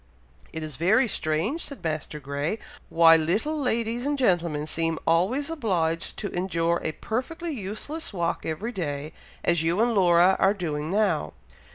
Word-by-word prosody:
"It 160 -1 -5
is 155 -4 -6
very 215 +10 +3
strange," 190 - -1
said 280 - -7
Master 155 -1 -3
Grey, 140 +7 -2 0.3
"why 165 -1 +7
little 200 - 0
ladies 235 -1 0
and 290 +1 0
gentlemen 170 - +1
seem 165 +1 -1
always 205 - +2
obliged 175 - -1
to 205 - -4
endure 170 -2 0
a 155 - -2
perfectly 320 - -4
useless 235 +8 -4
walk 170 -4 -2
every 190 +9 -3
day, 155 -6 -4 0.3
as 170 -2 +2
you 165 +4 +1
and 235 +1 +3
Laura 180 -1 +5
are 195 +2 +4
doing 155 -5 -3
now. 185 - +1
175 Hz, 155 wpm, -26 LUFS, 160-225 Hz, 0.3 s, why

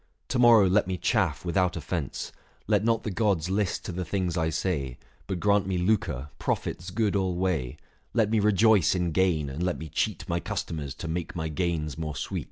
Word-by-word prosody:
To 130 - 0
morrow 115 -5 +7
let 95 +1 +3
me 95 -1 -2
chaff 90 - 0
without 90 0 +1
offence; 80 -2 -4 0.3
Let - - +2
not 115 0 +1
the 105 - -3
gods 95 -4 +1
list 100 -1 -1
to - - -3
the 90 +1 -3
things 90 -1 -1
I 80 -2 +1
say; 75 -7 -2 0.3
But 95 -3 -2
grant 100 -1 +2
me 95 -1 0
lucre, 85 - 0
profits 90 - -2
good 105 +1 0
alway; 90 -8 0 0.3
Let 110 -3 +2
me 110 - +3
rejoice 105 -3 +4
in 90 -2 0
gain, 85 -4 +2
and 70 +4 -5
let 90 0 0
me 80 - -7
cheat - - -2
My 85 0 0
customers 75 -3 -4
to 85 - -6
make 85 +1 -3
my 80 -1 -2
gains 80 -2 -2
more 75 -2 -3
sweet." 70 - -3
90 Hz, 195 wpm, -27 LUFS, 80-100 Hz, 0.3 s, morrow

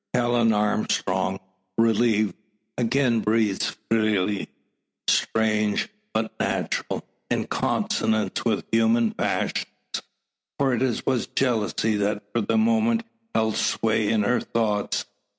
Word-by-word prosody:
Helen 120 -2 +3
Armstrong, 95 -3 0 0.4
relieved, 115 -2 +3 0.4
again 120 0 +2
breathes 110 -2 +1
freely. 105 -3 +1 0.6
Strange, 105 -2 +1 0.2
but 110 0 -1
natural; - - -2 0.2
in - - 0
consonance 110 -3 0
with 110 -3 0
human 115 0 +3
passions. - - -1 0.9
For 135 -2 +2
it 125 -1 0
was 125 -3 +1
jealousy 110 -3 0
that 105 0 -1
for 120 - +1
the 165 - +1
moment 230 +1 +3 0.3
held 110 -1 +1
sway 110 -1 +1
in 110 -1 +2
her 125 +4 +2
thoughts. 105 -3 -1
110 Hz, 105 wpm, -25 LUFS, 105-120 Hz, 0.9 s, Helen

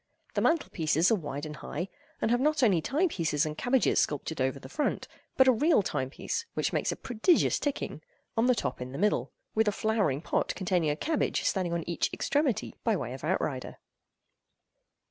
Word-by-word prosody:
The - - 0
mantelpieces 170 - +2
are - - +5
wide 145 -5 -5
and 150 0 -7
high, 175 +6 -4 0.3
and 225 - +1
have 245 - +3
not 300 -1 +2
only 190 -8 +4
time 295 - +1
pieces 160 - 0
and 155 0 -3
cabbages 245 +8 +2
sculptured 145 0 -1
over 130 +1 0
the 130 - -10
front, 290 - -2 0.3
but 265 - +6
a - - +8
real 275 - +3
time 130 -7 -2
piece, 455 - -3
which - - 0
makes - - +1
a - - -3
prodigious 255 +7 +2
ticking, 290 -1 -3 0.3
on 230 +2 +3
the 250 - +4
top 125 - -3
in 125 +1 -6
the - - -5
middle, 210 +3 +1 0.2
with 220 0 +2
a - - +4
flower 215 -10 +1
pot - - -1
containing 180 -4 +1
a 145 - +1
cabbage 310 - 0
standing 185 -3 0
on 170 -1 -2
each 170 - 0
extremity 285 -5 0
by 225 -2 +2
way 125 -9 -4
of 130 - -9
outrider. 150 -6 -2
190 Hz, 195 wpm, -29 LUFS, 150-250 Hz, 0.3 s, a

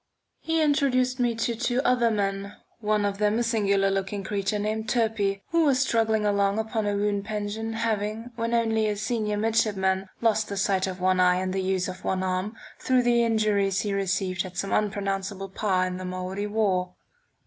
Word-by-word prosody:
He 325 -1 0
introduced 260 -4 +2
me 240 -2 +1
to 230 +1 -1
two 245 +2 -1
other 245 -2 +3
men, 200 -1 -2 0.2
one 210 -1 +1
of 200 0 -2
them 210 +1 +2
a 240 - +1
singular 200 -4 +2
looking 195 +1 -2
creature 200 +1 -1
named 215 +1 -2
Turpey, 215 -4 0
who 335 0 +3
was 280 -4 +3
struggling 225 -5 +1
along 200 0 +2
upon 220 -1 -1
a 205 - 0
wound 205 -1 0
pension, 215 +1 -3
having, 225 +1 -2
when 230 0 -1
only 225 -2 +2
a 210 - 0
senior 210 0 -1
midshipman, 195 -3 +1
lost 220 -2 +1
the 200 - -4
sight 190 -1 +1
of 185 -1 -5
one 185 0 +2
eye 180 0 +5
and 185 0 -2
the 190 - 0
use 185 -1 0
of 185 0 -7
one 190 0 -1
arm 185 +4 -2 0.2
through 255 -1 +2
the 240 -1 +3
injuries 210 -4 +1
he 205 -2 -2
received 190 -1 -1
at 185 -1 -9
some 195 - -2
unpronounceable 195 -1 -1
Pah 190 -1 0
in 185 0 -2
the 185 - -6
Maori 185 +2 -4
war. 190 -4 0
205 Hz, 190 wpm, -26 LUFS, 195-225 Hz, 0.2 s, eye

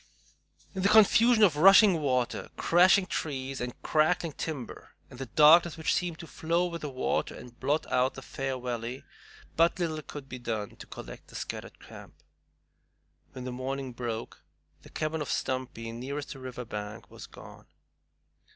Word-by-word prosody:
In 190 - -3
the 195 - +3
confusion 220 +2 +6
of 180 -8 +5
rushing 195 +1 +7
water, 125 -4 -1
crashing 185 +3 +5
trees, 135 -6 -4
and 125 0 -5
crackling 160 +1 +1
timber, 140 -7 -7 0.2
and 125 - -12
the 135 - -5
darkness 155 +7 +6
which 160 - 0
seemed 175 -3 -1
to 170 - -9
flow 170 +2 -1
with 170 -2 -5
the 150 - -4
water 130 -1 -2
and 120 -1 -13
blot 145 +4 0
out 130 +1 +2
the 135 - -9
fair 135 -1 -4
valley, 120 +1 -5 0.5
but 165 +1 +3
little 160 -3 -2
could 145 -2 -9
be 130 -1 -8
done 110 -4 -4
to - - -11
collect - - -10
the - - -15
scattered - - -6
camp. - - -13 1.2
When 130 - -7
the 125 - -5
morning 130 +1 -4
broke, 115 -2 -5 0.4
the - - -15
cabin 155 0 -3
of 145 - -4
Stumpy, 125 -3 -3
nearest 135 +5 -5
the 135 - -12
river 125 -1 -7
bank, 105 -1 -7
was - - -10
gone. - - -14
140 Hz, 165 wpm, -29 LUFS, 125-165 Hz, 1.2 s, rushing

